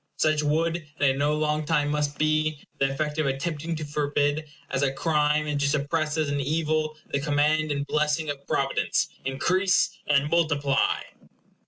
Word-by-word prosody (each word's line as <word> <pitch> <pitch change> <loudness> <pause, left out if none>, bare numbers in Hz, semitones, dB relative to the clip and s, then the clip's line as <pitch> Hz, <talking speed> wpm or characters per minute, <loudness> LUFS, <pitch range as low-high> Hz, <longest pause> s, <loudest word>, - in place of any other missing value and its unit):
Such 155 -1 +2
would, 160 +3 +1 0.2
and 140 - +4
in 135 - -3
no 145 +1 +2
long 155 0 0
time 150 -1 +1
must 150 -1 -1
be, 155 -1 +1 0.2
the 135 - +3
effect 150 +2 -2
of 155 - +1
attempting 155 +4 -2
to 155 -1 -4
forbid 145 +1 0 0.2
as 130 - 0
a 140 -1 +2
crime 150 +1 +1
and 150 -1 -1
to 145 - +2
suppress 150 +2 0
as 155 -1 +1
an 145 0 -1
evil 155 +1 0
the 140 - +1
command 150 +1 +1
and 140 0 -1
blessing 150 +1 0
of 140 -1 -5
providence, 135 0 0 0.2
INCREASE 180 +8 +2 0.2
AND 145 +1 +2
MULTIPLY. 145 -5 +2
150 Hz, 170 wpm, -26 LUFS, 145-155 Hz, 0.2 s, and